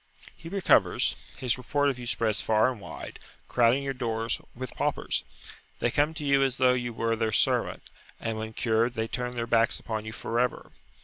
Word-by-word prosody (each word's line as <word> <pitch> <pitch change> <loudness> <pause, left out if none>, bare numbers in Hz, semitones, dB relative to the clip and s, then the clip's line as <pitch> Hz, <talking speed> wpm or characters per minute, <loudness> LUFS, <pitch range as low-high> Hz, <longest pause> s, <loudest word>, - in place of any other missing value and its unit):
He 165 - -10
recovers; 195 0 +3 0.2
his 130 -2 0
report 145 +3 +1
of 125 - -8
you 120 - -6
spreads 110 -3 0
far 110 +3 +3
and 115 -5 -9
wide, - - -8 0.3
crowding 120 +3 +3
your 135 -1 -2
doors 115 -2 -1
with 130 0 -6
paupers. - - -1 0.5
They 120 - 0
come 150 +4 +1
to 150 -2 -5
you 140 -1 +4
as 135 -1 +1
though 130 -1 +5
you 120 -1 -2
were 115 0 0
their 110 0 0
servant, - - +1 0.4
and 115 -1 -2
when 110 0 -5
cured 115 +1 +1
they 110 0 -1
turn 125 +1 -3
their 115 -1 -1
backs 115 +1 +2
upon 110 -2 -4
you 110 - -5
for 115 +1 -2
ever. 125 0 -1
120 Hz, 195 wpm, -28 LUFS, 115-130 Hz, 0.5 s, though